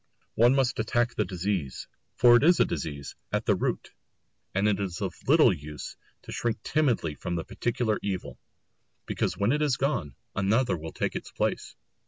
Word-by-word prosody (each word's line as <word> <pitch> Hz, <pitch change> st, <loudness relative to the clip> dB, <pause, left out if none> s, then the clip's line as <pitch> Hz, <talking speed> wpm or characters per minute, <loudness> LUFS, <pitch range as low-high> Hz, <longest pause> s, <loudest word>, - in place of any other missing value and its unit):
One 120 Hz, +3 st, +5 dB
must 130 Hz, -3 st, +1 dB
attack 120 Hz, +2 st, +1 dB
the 105 Hz, -, 0 dB
disease, 90 Hz, -6 st, -3 dB, 0.3 s
for 120 Hz, -1 st, +7 dB
it 120 Hz, -, +5 dB
is 175 Hz, +2 st, +5 dB
a -, -, +6 dB
disease, 70 Hz, -3 st, -4 dB, 0.2 s
at -, -, -1 dB
the -, -, +4 dB
root; -, -, -2 dB, 0.6 s
and 100 Hz, +2 st, +3 dB
it 105 Hz, -2 st, +1 dB
is 95 Hz, -3 st, -3 dB
of 95 Hz, -4 st, -2 dB
little 145 Hz, -, +6 dB
use 75 Hz, -2 st, -8 dB, 0.3 s
to -, -, -9 dB
shrink 115 Hz, -2 st, -2 dB
timidly 125 Hz, -, +1 dB
from 85 Hz, +4 st, -4 dB
the 85 Hz, -, -2 dB
particular 115 Hz, -2 st, -1 dB
evil, 95 Hz, -3 st, -4 dB, 0.7 s
because -, -, -1 dB
when 100 Hz, +3 st, +2 dB
it 150 Hz, +2 st, +1 dB
is 145 Hz, -5 st, +2 dB
gone, 120 Hz, -, -1 dB, 0.2 s
another 110 Hz, +6 st, +2 dB
will 80 Hz, -1 st, -7 dB
take -, -, -2 dB
its -, -, -5 dB
place. -, -, -2 dB
105 Hz, 180 wpm, -27 LUFS, 90-125 Hz, 0.7 s, for